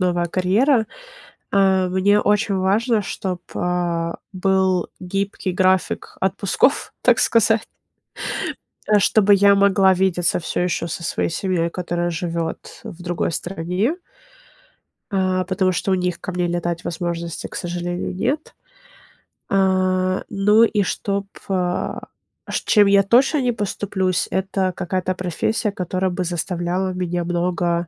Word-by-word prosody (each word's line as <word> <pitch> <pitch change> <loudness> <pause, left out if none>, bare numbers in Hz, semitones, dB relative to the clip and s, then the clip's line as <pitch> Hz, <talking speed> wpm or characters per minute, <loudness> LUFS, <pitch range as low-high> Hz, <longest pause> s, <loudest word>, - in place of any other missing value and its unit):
новая 175 -1 +1
карьера. 215 - +2 0.7
А, 190 -2 +3
мне 200 +3 +3
очень 205 -1 +1
важно, 210 +4 +2
чтоб, 180 -1 -4
а, 170 -1 -1 0.2
был 190 -1 +1
гибкий 195 +1 -3
график 185 0 0
отпусков, 195 +7 +1
так - - +4
сказать, 225 -1 +3 1.4
чтобы 205 0 +4
я 200 0 +5
могла 195 -1 +4
видеться 180 -2 +1
всё 165 - -3
еще 175 -1 -1
со 170 +1 -5
своей - - -1
семьей, 170 -2 -1
которая 175 -1 -2
живет 165 -1 -4
в 175 +1 -9
другой 175 -1 -1
стране. 180 - -2 1.2
А, 185 -1 +1
потому 185 0 +1
что 190 +2 -1
у - - +4
них 180 -2 -1
ко 185 - -5
мне 180 0 0
летать 175 -1 -2
возможности, 170 -1 -4
к - - -12
сожалению, 175 +1 -3
нет. 280 +11 -2 1.0
А, 185 -1 +1
ну 210 +3 +4
и 215 -2 +2
чтоб, 200 +1 -2 0.2
а, 180 -1 -2 0.4
ш - - -1
чем 205 -2 +5
я 200 0 +5
точно 260 +7 +3
не 250 -1 +1
поступлюсь- 190 -4 -1
это 190 0 -1
какая-то 185 +1 -2
профессия, 195 +4 -1
которая 185 0 -2
бы 180 +1 -2
заставляла 180 +2 -2
меня 175 -1 -2
много 175 0 0
185 Hz, 125 wpm, -21 LUFS, 175-200 Hz, 1.4 s, я